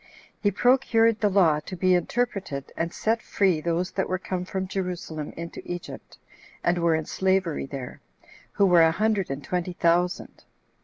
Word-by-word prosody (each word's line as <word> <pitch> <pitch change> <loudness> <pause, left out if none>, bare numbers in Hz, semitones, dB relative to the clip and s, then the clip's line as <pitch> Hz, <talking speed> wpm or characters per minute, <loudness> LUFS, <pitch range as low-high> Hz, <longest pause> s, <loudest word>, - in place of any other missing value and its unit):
He 205 - +3
procured 230 0 +3
the 210 - +2
law 175 -6 +4
to 170 +5 -8
be 185 +1 +2
interpreted, 180 - -1
and 165 +1 -2
set 225 +3 0
free 185 -6 +1
those 170 +2 -1
that 190 - -2
were 185 - 0
come 180 0 -4
from 190 0 -3
Jerusalem 180 -5 -4
into 170 0 -7
Egypt, 175 -1 -8 0.5
and 175 0 +2
were 170 -1 +3
in 160 -1 -2
slavery 190 -6 0
there, 135 -3 -7 0.5
who 200 - +3
were 175 -3 +6
a 165 - +6
hundred 210 +2 0
and 135 +1 -4
twenty 180 0 -2
thousand. 175 +1 0
180 Hz, 165 wpm, -25 LUFS, 165-195 Hz, 0.5 s, were